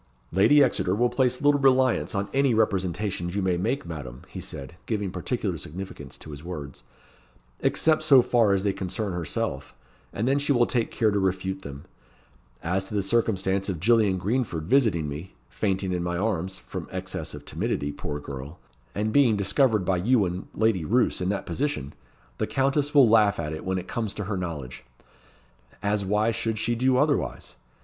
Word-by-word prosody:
"Lady 140 - +6
Exeter 95 -7 +1
will 120 +3 +2
place 130 0 +1
little 145 0 +4
reliance 130 -4 +3
on 100 0 -1
any 135 -3 +3
representations 95 -3 0
you 100 - 0
may 90 -1 +2
make, 95 +9 -1
Madam," 70 -7 -7
he - - -8
said, 70 +4 -7
giving 105 -4 -1
particular - - -2
significance 95 +5 -8
to 75 - -10
his 70 +1 -9
words, 75 -6 -7 0.8
"except 155 -1 +2
so 140 -5 +6
far 120 -4 +3
as 95 - -1
they 100 -1 +1
concern 95 +2 -3
herself, 70 -6 -3 0.4
and 110 +4 -2
then 135 +2 +3
she 145 0 0
will 120 -3 +4
take 120 -2 0
care 110 -2 +1
to 100 - +1
refute 95 0 -1
them. 70 -2 -9 0.8
As 90 +3 0
to 105 - -6
the 100 - +1
circumstance 100 -2 +1
of 90 -4 -3
Gillian 105 -1 +3
Greenford 100 -4 -1
visiting 105 - +2
me, 75 +6 -7 0.2
fainting 95 - -1
in 90 - -1
my 85 0 -2
arms 95 -2 -1
(from - - -7
excess - - -5
of - - -11
timidity, 70 0 -2
poor 75 0 -5
girl!) 70 +3 -8 0.4
and 110 +1 -1
being 125 -7 +4
discovered 105 0 +2
by 95 0 +1
you 110 +3 +3
and 90 +1 -4
Lady 110 -5 +2
Roos 120 +7 +1
in 90 - 0
that 100 0 -2
position, 135 - -2 0.5
the - - 0
Countess 140 +2 0
will 140 -4 +8
laugh 105 -3 +4
at 75 -2 -3
it 80 - -6
when 95 0 -1
it 90 0 -5
comes 110 -4 -3
to 105 - -3
her 100 +1 -3
knowledge 80 -9 -5 1.0
as 100 0 +1
why 105 +3 +1
should 115 -1 -2
she 120 +3 0
do 125 +2 +2
otherwise? 145 +1 0
100 Hz, 185 wpm, -26 LUFS, 90-120 Hz, 1.0 s, will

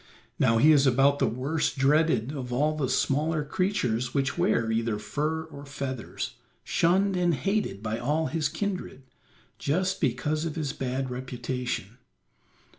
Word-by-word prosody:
Now 115 -3 +4
he 150 +7 +6
is 145 -2 +5
about 135 +3 +4
the - - +3
worst 140 +7 -1
dreaded 135 -3 +3
of 130 -4 -5
all 150 +5 +1
the 140 -4 -1
smaller 150 +3 +1
creatures 140 - -1
which 140 0 +1
wear 115 -1 +1
either 115 -1 0
fur 150 +9 -2
or 145 -3 -11
feathers, 135 -4 -5 0.3
shunned 190 +3 +2
and 175 -2 +2
hated 195 - -1
by 110 +1 -2
all 150 +6 0
his 155 -1 0
kindred, 185 -9 -4 0.6
just 180 +6 0
because 150 +2 0
of 165 -2 -3
his 150 -4 -2
bad 130 0 -3
reputation. 125 -3 -4
140 Hz, 145 wpm, -27 LUFS, 125-160 Hz, 0.6 s, he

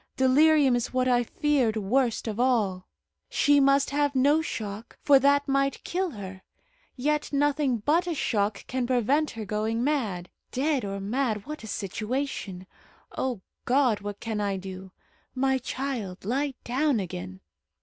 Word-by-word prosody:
Delirium 275 +1 +5
is 240 - -2
what 255 0 +1
I 245 -1 +4
feared 260 -4 +1
worst 230 +3 0
of 220 0 -4
all. 210 -8 +1 0.4
She 290 0 +4
must 275 0 +3
have 285 -1 +1
no 285 +4 +4
shock, 215 -7 -6
for 280 -2 +6
that 280 +1 +3
might 275 0 0
kill 370 +1 -1
her; 190 - -8 0.5
yet 295 +3 -1
nothing 285 -2 +1
but 320 +11 +1
a 340 - -1
shock 205 -6 -1
can 255 -1 -2
prevent 260 +5 +2
her 225 -2 -6
going 220 +3 -1
mad. 220 -12 -1 0.2
Dead 275 +1 0
or 200 0 -4
mad! 215 0 -1
what 305 -4 -7
a - - -7
situation. 210 -1 -4 0.5
O 250 -7 -2 0.2
God! 250 -4 +3
what 205 0 -6
can 220 -2 -3
I 200 -1 -1
do? 190 0 -8 0.4
My 265 0 +1
child, 245 -9 -4
lie 270 +4 -1
down 265 0 +1
again." 95 - -6
255 Hz, 150 wpm, -27 LUFS, 210-280 Hz, 0.5 s, for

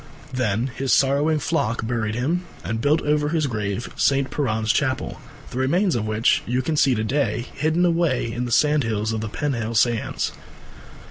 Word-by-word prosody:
Then 125 0 0
his 135 -1 -1
sorrowing 140 +3 +3
flock 120 -8 -1
buried 110 -2 -1
him 160 +9 0 0.2
and 115 +1 -3
built 150 +4 +3
over 150 0 +1
his 160 -1 +1
grave 110 -2 -3
St. 135 -1 +2
Piran's 110 -6 0
Chapel, 130 -4 -1 0.3
the 125 - -4
remains 170 +7 +2
of 110 -2 -1
which 110 +1 +2
you 125 +2 0
can 155 +4 -1
see 135 -3 +3
to 110 - -1
day 120 -2 0
hidden 160 +5 +1
away 165 -9 +1
in 120 +2 -3
the 120 - -5
sandhills 115 -7 +2
of 110 - -2
the 110 - -4
Penhale 115 -3 -2
Sands. 115 0 +1
130 Hz, 175 wpm, -23 LUFS, 110-150 Hz, 0.3 s, sorrowing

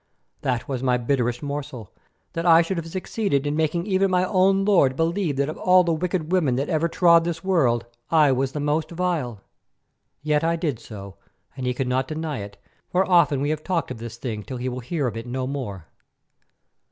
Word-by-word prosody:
That 125 -2 -1
was 130 -3 -3
my 125 -2 +2
bitterest 120 0 -1
morsel, 140 -7 -5 0.4
that 165 - -2
I 170 -1 +6
should 185 +2 -3
have 165 -1 -4
succeeded 185 -4 -1
in 145 0 -1
making 160 +2 0
even 195 -1 +2
my 180 0 +2
own 195 +1 +3
lord 170 -11 +4
believe 165 0 0
that 140 +1 0
of 155 - -6
all 185 0 +5
the 170 -1 +1
wicked 170 0 -2
women 160 -9 +2
that 135 +3 -2
ever 160 +1 +1
trod 170 0 +5
this 165 -1 -4
world, 135 -12 +2 0.2
I 155 -4 +5
was 130 +1 0
the 150 - -3
most 150 +2 0
vile. 165 - -2 0.8
Yet 150 0 +1
I 165 +1 +2
did 155 -8 -2
so, 100 -4 -10 0.4
and 130 -2 -4
he 125 - 0
cannot 130 0 0
deny 155 -2 -4
it, 100 0 -8 0.3
for 185 +1 +1
often 170 -6 +4
we 145 +1 0
have 155 0 -3
talked 175 -7 -1
of 120 - -6
this 115 0 -7
thing 115 -4 -4
till 130 +4 -7
he 125 +1 -3
will 125 0 -5
hear 145 +4 -2
of 115 -4 -2
it 115 +2 -6
no 130 +1 -3
more. 120 - -5
150 Hz, 205 wpm, -24 LUFS, 125-170 Hz, 0.8 s, I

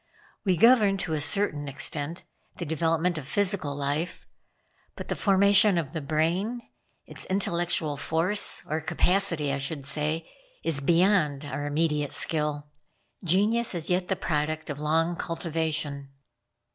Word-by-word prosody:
We 185 -4 +1
govern 220 -3 +5
to 170 -3 -3
a 155 - -1
certain 155 -3 +2
extent 145 +4 -3 0.3
the 170 - -4
development 165 +2 0
of 135 - -10
physical 180 -5 +1
life; 145 +4 -3 0.7
but - - -8
the - - -1
formation 200 0 +4
of 155 -5 -3
the 160 - -3
brain 170 - -1 0.5
its - - -8
intellectual 175 -5 -1
force, 165 +8 +1
or 155 +1 -2
capacity 170 -3 +1
I 135 - -2
should 140 0 -4
say 155 +3 -1 0.4
is 155 -4 +2
beyond 165 -2 +2
our 145 +1 -4
immediate 150 -1 0
skill. 150 -1 +1 0.6
Genius 205 +6 +2
is 165 0 -3
yet 180 0 0
the 190 - 0
product 155 -2 -2
of 145 - -7
long 165 +3 +1
cultivation." 160 -4 -3
160 Hz, 135 wpm, -26 LUFS, 150-185 Hz, 0.7 s, govern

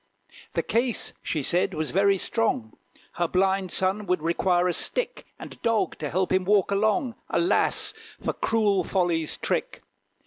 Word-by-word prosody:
The - - 0
case, 240 0 0
she 155 -3 -2
said, 175 +6 +1
was 155 -1 -2
very 195 +1 +3
strong: 185 - -1 0.4
Her 175 - -1
blind 190 +1 +1
son 190 +2 0
would 180 -3 0
require 175 +2 +2
a 180 - +1
stick - - -1
And - - -11
dog, 230 -2 +1
to 150 - -3
help 185 +4 0
him 185 0 +2
walk 200 0 +2
along. 215 +5 +1 0.2
Alas! 345 - +2 0.3
for - - -2
cruel 210 -4 +1
Folly's 170 -4 0
trick. - - -2
190 Hz, 150 wpm, -25 LUFS, 175-210 Hz, 0.4 s, very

